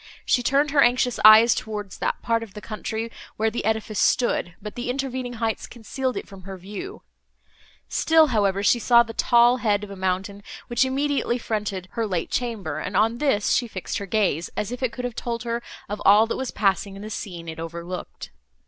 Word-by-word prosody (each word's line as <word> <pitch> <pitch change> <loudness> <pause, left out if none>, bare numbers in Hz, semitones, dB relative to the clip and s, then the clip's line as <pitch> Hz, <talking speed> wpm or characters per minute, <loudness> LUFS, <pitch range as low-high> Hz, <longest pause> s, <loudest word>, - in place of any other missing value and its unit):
She 245 - +3
turned 275 +4 +2
her 285 -1 +4
anxious 250 -1 +2
eyes 220 +2 +9
towards 210 -3 -5
that - - -2
part 230 0 +1
of 220 -3 -10
the - - -6
country, 220 +1 -5 0.3
where 220 +1 +1
the 235 - -3
edifice 220 -2 -1
stood, 175 -8 +1
but 210 0 -8
the 245 0 -5
intervening 260 -1 -3
heights 225 -1 -2
concealed 255 +3 -4
it - - -5
from 195 -2 -12
her 190 0 -8
view; 205 - -8 0.8
still, 320 -1 +4
however, 200 -2 +1
she 240 - +4
saw 235 0 +5
the 225 -1 -9
tall 240 +2 +4
head 210 -4 +1
of 205 - -8
a - - -7
mountain, 190 +2 -2 0.2
which 240 +2 +2
immediately 270 -2 0
fronted 210 -5 -3
her 230 -1 -2
late 180 -4 -2
chamber, 235 -5 -2
and 185 - -3
on 225 +3 +2
this 270 -9 +1
she 240 - +1
fixed 190 -5 -4
her 200 - -6
gaze, 185 -6 0
as 210 +2 -2
if 245 - -6
it 255 -3 0
could 250 0 -5
have 245 - -3
told 235 0 -4
her 235 0 -2 0.3
of 205 0 -5
all 210 +3 +7
that 225 - -3
was 265 -2 -3
passing 195 -1 0
in 200 - -9
the 215 - -7
scene 175 -5 -6
it 160 0 -7
overlooked. 170 +2 -7
220 Hz, 205 wpm, -24 LUFS, 200-245 Hz, 0.8 s, eyes